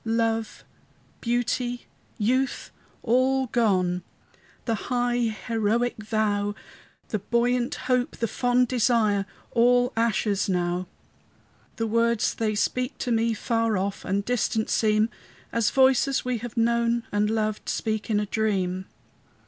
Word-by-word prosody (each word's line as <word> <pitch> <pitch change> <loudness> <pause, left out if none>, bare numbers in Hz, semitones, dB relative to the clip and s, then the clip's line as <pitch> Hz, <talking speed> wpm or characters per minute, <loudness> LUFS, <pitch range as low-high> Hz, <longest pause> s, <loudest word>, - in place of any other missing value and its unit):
Love, 225 -1 -1 0.6
beauty, 245 +1 -1 0.3
youth, 255 +5 0 0.3
all 260 +2 +2
gone! 185 -7 +1 0.6
The 230 - 0 0.2
high, 245 -1 +1 0.3
heroic 230 +1 +1
vow, 210 -1 0 0.5
The 215 - -1
buoyant 240 +4 0
hope, 250 -1 0
the 230 - 0
fond 245 +3 +2
desire, 220 -5 +2 0.2
All 245 +1 +3
ashes 215 -3 +1
now! 180 0 -1 0.9
The 225 - -1
words 230 0 +1
they 215 -2 -1
speak 250 +5 -1
to 250 - -3
me 230 0 +2
Far 225 -1 0
off 195 +1 -3
and 200 +1 -1
distant 225 -2 0
seem, 215 0 +2 0.4
As 230 -2 +2
voices 265 0 +3
we 250 -2 -1
have 240 0 -8
known 235 0 +2
and 205 +1 +1
loved 215 -1 -1
Speak 220 -1 -2
in 210 -2 +2
a 210 - -1
dream. 190 -4 -1
230 Hz, 125 wpm, -25 LUFS, 210-245 Hz, 0.9 s, All